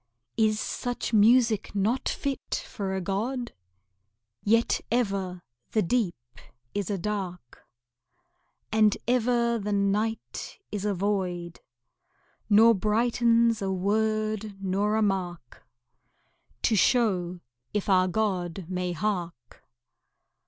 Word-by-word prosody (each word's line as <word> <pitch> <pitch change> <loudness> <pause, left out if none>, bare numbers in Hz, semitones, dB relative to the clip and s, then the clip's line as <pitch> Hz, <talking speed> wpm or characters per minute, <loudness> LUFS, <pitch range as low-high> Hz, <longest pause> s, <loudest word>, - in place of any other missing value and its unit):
Is 215 -1 +2
such 245 0 -3
music 225 -1 +4
not 220 +6 +1
fit 275 -2 -3
for 195 -2 -4
a 190 - -2
god? 235 +7 -2 0.9
Yet 230 +3 +2
ever 195 -6 -1 0.3
the 215 - +3
deep 195 -1 +1 0.6
is 200 -3 -2
a 200 - -1
dark, 180 - -5 1.1
And 215 -1 +4
ever 235 -1 +2
the 210 0 -3
night 205 +3 -1
is 205 -1 -3
a 205 -1 0
void, 180 -3 -2 0.9
Nor 225 +2 +7
brightens 230 +2 +2
a 195 -1 -1
word 215 +2 0
nor 195 +2 0
a 220 - +2
mark 180 - -3 1.0
To 225 - +3
show 185 -6 +2 0.3
if 210 -2 -2
our 185 -2 +4
God 185 -3 -1
may 180 -1 -2
hark. 175 - -4
210 Hz, 105 wpm, -27 LUFS, 185-225 Hz, 1.1 s, Nor